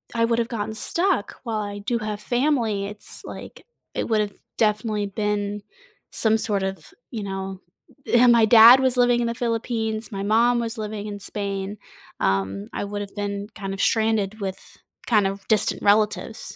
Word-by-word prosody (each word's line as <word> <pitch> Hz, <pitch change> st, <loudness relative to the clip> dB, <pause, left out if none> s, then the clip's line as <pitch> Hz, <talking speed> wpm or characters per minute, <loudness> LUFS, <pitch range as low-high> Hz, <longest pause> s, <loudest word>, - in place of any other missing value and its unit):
I 230 Hz, -, +3 dB
would 230 Hz, 0 st, +1 dB
have 230 Hz, -, 0 dB
gotten 220 Hz, -2 st, -4 dB
stuck 345 Hz, -, 0 dB
while 225 Hz, -3 st, -2 dB
I 205 Hz, -1 st, -5 dB
do 235 Hz, +3 st, -2 dB
have 215 Hz, -1 st, -4 dB
family, 240 Hz, -4 st, 0 dB
it's, 210 Hz, 0 st, -1 dB
like -, -, -10 dB, 0.3 s
it -, -, -3 dB
would 215 Hz, -1 st, +2 dB
have 205 Hz, -1 st, -3 dB, 0.2 s
definitely 215 Hz, -1 st, +1 dB
been 205 Hz, 0 st, -2 dB, 0.5 s
some 220 Hz, 0 st, +2 dB
sort 205 Hz, -3 st, +1 dB
of, 190 Hz, -4 st, -5 dB, 0.2 s
you 220 Hz, -4 st, -4 dB
know 195 Hz, -1 st, -5 dB, 0.5 s
and 240 Hz, 0 st, +6 dB
my 230 Hz, -2 st, +5 dB
dad 235 Hz, +3 st, +9 dB
was 260 Hz, -1 st, +2 dB
living 245 Hz, -1 st, +4 dB
in 240 Hz, -, 0 dB
the 235 Hz, -, -1 dB
Philippines, 225 Hz, -2 st, -2 dB
my 195 Hz, -1 st, -4 dB
mom 235 Hz, +3 st, +3 dB
was 230 Hz, 0 st, -3 dB
living 210 Hz, -1 st, -5 dB
in 205 Hz, -1 st, -6 dB
Spain, 200 Hz, 0 st, -3 dB, 0.4 s
um, 95 Hz, +1 st, -1 dB
I -, -, -3 dB
would've 205 Hz, 0 st, -6 dB
been 200 Hz, 0 st, -4 dB
kind 195 Hz, -1 st, -5 dB
of 195 Hz, -, -4 dB
stranded 220 Hz, -2 st, +1 dB
with 190 Hz, -1 st, -6 dB, 0.3 s
kind 210 Hz, -4 st, +3 dB
of 195 Hz, 0 st, -4 dB
distant 215 Hz, -2 st, +3 dB
relatives. 210 Hz, +1 st, +1 dB
210 Hz, 175 wpm, -23 LUFS, 200-230 Hz, 0.5 s, dad